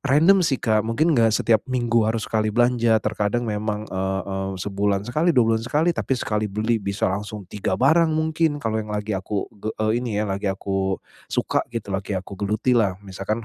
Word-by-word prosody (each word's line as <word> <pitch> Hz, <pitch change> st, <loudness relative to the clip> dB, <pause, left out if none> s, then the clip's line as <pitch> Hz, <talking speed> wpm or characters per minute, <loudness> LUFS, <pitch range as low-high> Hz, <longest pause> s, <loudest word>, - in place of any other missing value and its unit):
random 165 Hz, +8 st, +5 dB
sih, 135 Hz, -4 st, +1 dB
Kak, 110 Hz, -2 st, +3 dB
mungkin 155 Hz, +9 st, +2 dB
enggak 115 Hz, -2 st, +4 dB
setiap 115 Hz, -2 st, +3 dB
minggu 120 Hz, -3 st, +1 dB
harus 110 Hz, -1 st, -1 dB
sekali 110 Hz, -1 st, 0 dB
belanja. 120 Hz, -1 st, +3 dB
Terkadang 105 Hz, +2 st, -1 dB
memang, 105 Hz, -1 st, -2 dB
eee, 95 Hz, +1 st, -2 dB
eee, 95 Hz, 0 st, -3 dB
sebulan 100 Hz, 0 st, 0 dB
sekali, 155 Hz, +9 st, +1 dB
2 115 Hz, -2 st, +4 dB
bulan 110 Hz, -, 0 dB
sekali, 155 Hz, +7 st, +2 dB
tapi 135 Hz, -, -2 dB
sekali 105 Hz, -3 st, -1 dB
beli 110 Hz, +3 st, 0 dB
bisa 100 Hz, -1 st, -1 dB
langsung 105 Hz, 0 st, -5 dB
3 100 Hz, +2 st, -2 dB
barang 160 Hz, +5 st, +4 dB
mungkin. 155 Hz, -1 st, +1 dB
Kalau 110 Hz, -1 st, 0 dB
yang 110 Hz, -, -7 dB
lagi 105 Hz, +1 st, -2 dB
aku 95 Hz, +1 st, -3 dB
ge 105 Hz, +1 st, -7 dB, 0.2 s
eee, 110 Hz, +2 st, +1 dB
ini 115 Hz, -4 st, -3 dB
ya 105 Hz, -, +1 dB
lagi 100 Hz, +1 st, -2 dB
aku 95 Hz, 0 st, -1 dB, 0.3 s
suka -, -, 0 dB
gitu, 105 Hz, -4 st, -4 dB
lagi 95 Hz, 0 st, -2 dB
aku 95 Hz, +2 st, -6 dB
gelutilah. 105 Hz, -1 st, +1 dB
Misalkan 100 Hz, +4 st, -4 dB
110 Hz, 190 wpm, -23 LUFS, 100-120 Hz, 0.3 s, random